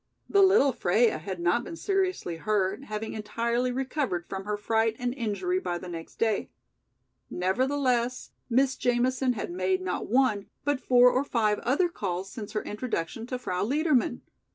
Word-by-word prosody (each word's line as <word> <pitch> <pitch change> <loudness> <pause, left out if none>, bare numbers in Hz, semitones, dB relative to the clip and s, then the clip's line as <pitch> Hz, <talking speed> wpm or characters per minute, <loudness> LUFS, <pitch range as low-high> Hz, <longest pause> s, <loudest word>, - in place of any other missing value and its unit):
The 400 - +4
little 380 -8 +5
Freia 220 -3 +2
had 185 +3 -5
not 175 +8 +2
been 330 - -7
seriously 370 - -1
hurt, 205 +5 0
having 215 -1 -4
entirely 235 +3 -1
recovered 255 - -2
from 190 0 -5
her 210 0 -2
fright 225 +1 +1
and 245 0 -2
injury 265 - -1
by 175 - -3
the 180 - -8
next 165 -2 -8
day. 220 -3 0 0.8
Nevertheless, 250 +5 0 0.2
Miss 265 +2 +3
Jamison 250 +1 +1
had 215 - -4
made 185 +1 0
not 185 -1 -3
one, 215 -4 +2 0.2
but 290 -2 0
four 250 0 +6
or 260 - +1
five 215 -6 +1
other 285 +9 +2
calls 190 - -4
since 215 -3 -7
her 215 - -1
introduction 225 -1 -4
to 255 - -3
Frau 180 -7 -2
Liedermann. 265 -1 +1
235 Hz, 160 wpm, -28 LUFS, 200-260 Hz, 0.8 s, four